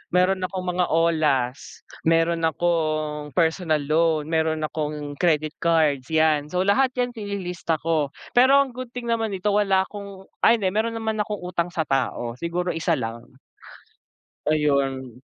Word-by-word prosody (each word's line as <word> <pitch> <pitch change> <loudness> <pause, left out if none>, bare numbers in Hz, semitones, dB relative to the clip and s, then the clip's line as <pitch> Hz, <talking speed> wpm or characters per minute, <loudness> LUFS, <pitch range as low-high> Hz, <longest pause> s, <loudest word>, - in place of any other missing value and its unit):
meron 185 +1 +3
akong 185 0 -3
mga 180 -1 +2
olas, 155 -5 0 0.2
meron 165 0 +2
akong 155 -3 -1
personal 160 -2 +2
loan, 155 0 +1
meron 160 -1 +1
akong 150 -2 -4
credit 155 -2 +1
cards, 155 -6 +2
yan, 155 -2 +3
so 180 - -1
lahat 255 +7 +3
yan 245 0 0
ililista 190 -6 -3
ko, 155 -4 0 0.2
pero 265 +3 +6
ang 265 -3 0
good 255 -1 -7
thing 245 -1 -6
naman 225 -2 0
ito 195 +1 -3
wala 195 -2 +3
akong 200 -2 -9 0.2
ay 230 - +7
hindi 190 - 0
meron 225 +2 -1
naman 220 -1 -2
akong 210 -1 -5
utang 180 -1 -3
sa 160 -2 -1
tao 120 -3 -1
siguro 175 +1 -2
isa 165 0 +1
lang. 115 -2 -5 1.3
Ayun. 140 -4 +1
165 Hz, 150 wpm, -24 LUFS, 150-195 Hz, 1.3 s, ay